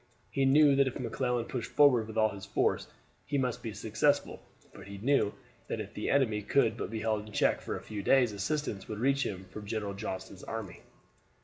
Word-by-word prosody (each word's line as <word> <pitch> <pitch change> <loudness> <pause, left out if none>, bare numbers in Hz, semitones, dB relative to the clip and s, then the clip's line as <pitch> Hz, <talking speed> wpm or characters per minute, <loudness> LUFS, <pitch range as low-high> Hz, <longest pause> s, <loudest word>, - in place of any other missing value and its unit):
He 135 -1 +1
knew 145 +1 +6
that 140 -1 +4
if 130 - -4
McClellan 125 0 -1
pushed 125 -2 -4
forward 130 -7 +5
with 110 0 -7
all 110 0 +4
his 100 -1 -8
force - - +1 0.4
he 145 - 0
must 125 -3 -1
be 115 - -4
successful; 115 +8 0 0.3
but - - -12
he 100 0 -8
knew 135 +8 +3
also 100 - -6 0.3
that - - -3
if - - -6
the - - -3
enemy 120 -7 +2
could 110 +1 +2
but - - -4
be 110 -1 -4
held 110 -1 -1
in - - -11
check - - +2
for - - -4
a - - -7
few 105 -2 -5
days 125 +2 +4
assistance 105 0 -3
would 110 - -5
reach 135 +4 +2
him 95 -1 -4
from 105 0 -8
General 105 -2 -3
Johnston's 100 -1 -6
army. 110 -5 -6
110 Hz, 215 wpm, -31 LUFS, 105-135 Hz, 0.4 s, knew